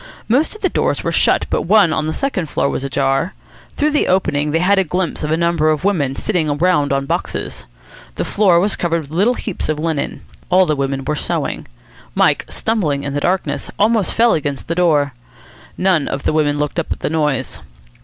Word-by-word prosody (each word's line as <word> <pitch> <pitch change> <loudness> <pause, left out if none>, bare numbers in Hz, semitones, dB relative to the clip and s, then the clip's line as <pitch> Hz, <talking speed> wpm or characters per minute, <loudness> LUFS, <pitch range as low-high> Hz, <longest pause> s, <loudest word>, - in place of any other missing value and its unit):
Most 275 - +2
of 430 - -13
the 375 - +3
doors - - 0
were - - -1
shut - - +2
but - - +1
one 195 -4 +4
on 155 -1 -1
the - - -1
second 190 - -2
floor - - 0
was - - -3
ajar. 135 +3 0 0.4
Through 300 +1 +2
the 295 - +1
opening 150 -6 +1
they 155 - +1
had 195 +4 +3
a - - +3
glimpse 180 0 -2
of 150 - -2
a 160 - +1
number 170 -2 +2
of 155 +1 0
women 150 -10 +1
sitting 155 -8 -1
round 160 -4 +2
on 135 0 0
boxes. 65 - -4 0.5
The - - -2
floor 190 -5 +3
was 200 +3 +1
covered 170 -1 -1
with 145 -1 -13
little 205 +10 +2
heaps 210 -9 -4
of 155 - 0
linen. 155 -2 -3 0.3
All 185 +1 +5
the 155 - 0
women 135 -1 -2
were 150 - -1
sewing. - - -3 0.5
Mike, - - +2
stumbling 165 -11 -1
in 140 - -4
the 145 - 0
darkness, 165 -3 -1
almost 215 -1 +2
fell 235 +1 +4
against 145 -3 -3
the 165 - -1
door. 155 -6 +2 0.6
None 180 -5 +2
of 135 - -3
the - - +1
women 145 -2 +1
looked 150 +3 -1
up 165 - -4
at - - -3
the - - -1
noise. 150 - -1
160 Hz, 210 wpm, -18 LUFS, 145-190 Hz, 0.6 s, All